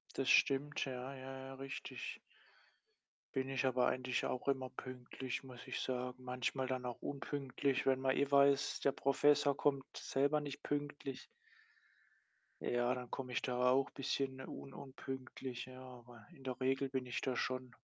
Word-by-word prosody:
Das 135 - +1
stimmt, 140 +2 +4
ja, 130 0 -4
ja, 130 0 -7
ja, 135 - -7
richtig. 135 +1 -5 1.2
Bin 130 0 +1
ich 135 0 0
aber 125 -1 +4
eigentlich 130 -1 0
auch 130 +2 -1
immer 130 -2 +1
pünktlich, 130 0 -5
muss 125 -2 -10
ich - - -3
sagen. 125 0 -2
Manchmal 125 +1 -1
dann 130 -1 -1
auch 120 -1 -4
unpünktlich, 140 -1 -1
wenn 130 -1 +3
man 130 0 +2
eh 140 0 +3
weiß, 140 0 +5
der 140 - +4
Professor 145 +1 +4
kommt 140 -2 +2
selber 145 +2 +2
nicht 140 -2 -6
pünktlich. 145 -2 -3 1.4
Ja, 120 +1 +2
dann 125 -1 -5
komme 125 -2 -4
ich - - +1
da 125 0 +3
auch 135 +2 +4
bisschen 135 0 -1
un 135 +1 -7
unpünktlich, 130 -2 -6
ja. 130 0 -10
Aber 120 -3 -12
in 135 - -15
der 130 -1 -3
Regel 135 +1 +2
bin 130 -1 -2
ich 120 - -1
da 130 -2 0
schon 130 0 -2
130 Hz, 160 wpm, -38 LUFS, 125-135 Hz, 1.4 s, weiß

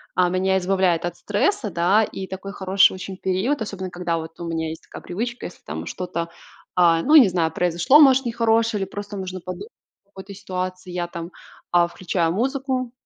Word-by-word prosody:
а, 180 -1 +3
меня 190 +1 +1
избавляет 185 -2 +1
от 175 0 -4
стресса, 210 - 0
да. 180 +5 +3
И 190 -2 -5
такой 195 +1 -7
хороший 190 0 +4
очень 185 0 -7
период, 195 +9 -1
особенно 195 -3 -4
когда 175 -2 -2
вот 160 0 -8
у 170 - -5
меня 160 -1 -2
есть 160 - -8
такая - - -11
привычка: 235 +7 -4
если 175 - -15
там 80 +3 -5
что-то, 170 -2 -4 0.5
а, 170 -2 +4
ну, 300 - +4
не 275 -8 +9
знаю, 170 -3 0
произошло, 180 - +4
может, 270 -2 +6
нехорошее 230 -2 +1
или - - -6
просто 205 0 -6
нужно 185 -1 -5
подумать 185 - -7 0.4
о 200 - -38
какой-то 195 0 -10
ситуации. 185 -1 -5
Я 175 -1 -2
там, 170 0 -7 0.4
а, 175 -1 +4
включаю 170 -1 -1
музыку, 260 +3 -1
185 Hz, 190 wpm, -22 LUFS, 175-210 Hz, 0.5 s, не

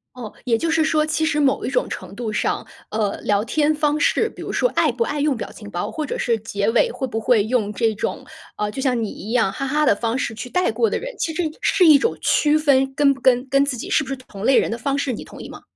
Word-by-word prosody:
哦， 235 -4 -7
也 230 -2 +2
就 330 +4 -1
是 325 0 +2
说 310 -1 +2
其 315 +1 0
实 300 -1 +1
某 275 -2 +1
一 - - -1
种 - - 0
程 - - -7
度 230 -3 -4
上， 210 - -1 0.2
呃， 210 -2 -1
聊 205 0 +1
天 305 +4 +1
方 300 0 +1
式， 445 +8 +2
比 - - -12
如 - - -6
说 - - +2
爱 - - +2
不 - - 0
爱 295 -9 -3
用 290 -2 +1
表 - - -6
情 210 -1 -11
包， 175 -3 -4
或 310 - -3
者 - - -4
是 230 -2 +1
结 205 -1 -2
尾， 230 - +3
会 - - -4
不 225 -3 -3
会 220 -2 +3
用 220 -2 0
这 225 0 +1
种， - - -4 0.3
呃， 210 0 -2
就 265 - -5
像 250 -4 +1
你 215 - -3
一 215 - -8
样 225 -6 +2
“哈 275 +6 -4
哈” 300 +3 +1
的 - - +5
方 230 +3 -2
式 240 -3 -2
去 225 +3 -7
带 360 -5 +1
过 225 0 +1
的 - - -1
人， - - -6
其 320 - -1
实 355 - -1
也 310 - -2
是 370 -3 +3
一 305 -3 +8
种 460 - 0
区 300 0 +3
分， 270 -3 +2
跟 280 -1 +4
不 270 - -13
跟 255 0 +3
跟 275 +1 +3
自 280 -2 -2
己 240 - -7
是 310 - +2
不 - - -14
是 270 - -3
同 220 -5 -9
类 265 - +5
人 - - +2
的 230 - -3
方 275 +3 -1
式， 280 -2 -1
你 225 - -6
同 - - -12
意 - - -9
吗？ - - -11
260 Hz, 310 characters per minute, -21 LUFS, 225-300 Hz, 0.3 s, 一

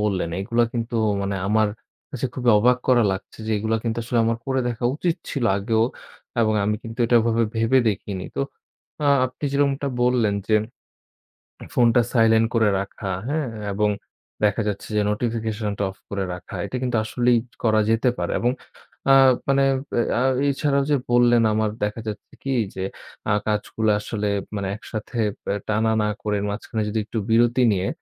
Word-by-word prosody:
বললেন 95 -5 0
এগুলা 120 +3 +2
কিন্তু 115 -1 -2 0.3
মানে 100 0 -2
আমার 110 0 +3 0.4
কাছে 130 -2 -2
খুবই 125 -2 +2
অবাক 125 +3 +4
করা 120 -2 +5
লাগছে 95 +3 -7
যে - - -2
এগুলা 110 +2 0
কিন্তু 115 0 -2
আসলে 115 +1 -1
আমার 115 0 0
করে 130 -1 +1
দেখা 120 0 -4
উচিত 170 +1 0
ছিল 135 -4 -2
আগেও। 110 +3 +1 0.6
এবং 110 -1 +2
আমি 105 +1 +1
কিন্তু 115 +1 -9
এটা 120 - +4
ওভাবে 115 0 +2
ভেবে 115 +4 +3
দেখিনি। 100 -1 -3
তো - - 0 0.6
আ - - +1 0.2
আপনি 130 +3 -10
যেরকমটা 140 0 +1
বললেন 120 -4 +2
যে 110 - +4 1.2
ফোনটা 120 0 +4
সাইলেন্ট 115 -1 +4
করে 110 -2 +3
রাখা 100 0 -5 0.2
হ্যাঁ? 150 -2 -1 0.3
এবং 105 +1 +2 0.5
দেখা 105 +1 +3
যাচ্ছে 100 -1 -3
যে 105 - +3
নোটিফিকেশন 110 -1 -2
টা - - +1
অফ - - -19
করে 100 -1 -2
রাখা। 90 - -9
এটা 115 - -6
কিন্তু 125 -3 0
আসলেই 120 +2 +2 0.3
করা 110 -1 +3
যেতে 115 +3 +3
পারে। - - -2
এবং 120 +1 +2 0.6
আ - - +8 0.4
মানে 135 0 +4 0.6
আ - - +1 0.3
এছাড়াও 140 0 +1
যে - - +5 0.2
বললেন 120 -1 +5
আমার 110 0 +1
দেখা 105 +2 -2
যাচ্ছে 105 - -7
কি 135 0 -1 0.2
যে 95 - -3 0.5
আ - - +4
কাজগুলা 105 0 0
আসলে 105 -1 -3 0.3
মানে 100 -1 -2
একসাথে 110 +1 -7 0.4
আ - - -1
টানা 110 +1 +1
না - - +1 0.2
করে 105 -1 0
মাঝখানে 110 +1 -3
যদি 110 +1 -1
একটু 115 - -5
বিরতি 120 +2 +4
নিয়ে 95 -1 0
115 Hz, 170 wpm, -23 LUFS, 105-120 Hz, 1.2 s, আ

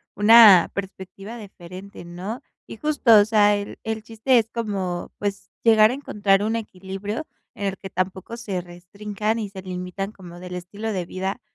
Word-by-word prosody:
una 205 -3 +8
perspectiva 195 +3 -7
diferente, 190 -2 -11
¿no?, 185 +9 -6 0.2
y - - -10
justo, 265 -6 +4
o 205 - +4
sea, 210 -1 +4
el 205 0 -7
el 220 0 -3
chiste 225 +3 +2
es 225 0 -3
como, 195 -7 -3
pues, 200 -1 -4
llegar 220 -1 +6
a - - -2
encontrar 205 -7 +1
un 220 +2 0
equilibrio 200 +4 -5 0.3
en 200 - -4
el 195 0 -3
que 195 - -9
tampoco 190 +5 -3
se 195 -6 -4
restrinjan 200 +5 -4
y 210 -3 -4
se 190 -1 -9
limitan 185 +2 -5
como 175 -3 -12
del 180 0 -7
estilo 200 +5 -5
de 185 -3 -3
vida 190 +6 -4
200 Hz, 170 wpm, -23 LUFS, 185-220 Hz, 0.3 s, una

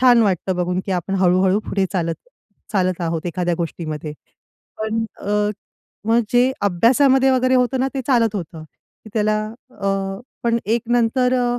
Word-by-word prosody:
छान 245 -2 +6
वाटतं 190 -2 0
बघून, 180 +1 0
की 195 - -1
आपण 185 +2 -2
हळू-हळू 185 +2 +3
पुढे 195 -1 +1
चालत 165 -3 0 0.6
चालत 185 -3 +1
आहोत 165 -1 -2
एखाद्या 175 0 -1
गोष्टीमध्ये. 155 -3 -4 0.7
पण 220 +1 -1 0.2
अ, 210 0 +1 0.6
मग 230 +1 +4
जे 245 +1 +4
अभ्यासामध्ये 260 +8 +4
वगैरे 255 0 +2
होतं 255 +1 +2
ना 265 - +1
ते 270 - -1
चालत 230 -5 +2
होतं, 165 -3 -6
की 215 +7 -20
त्याला 215 -1 +2 0.4
अ, 200 - -2 0.6
पण 235 0 +2
एक 225 +3 0
नंतर 245 +2 +2
अ 245 0 0
210 Hz, 155 wpm, -20 LUFS, 180-245 Hz, 0.7 s, छान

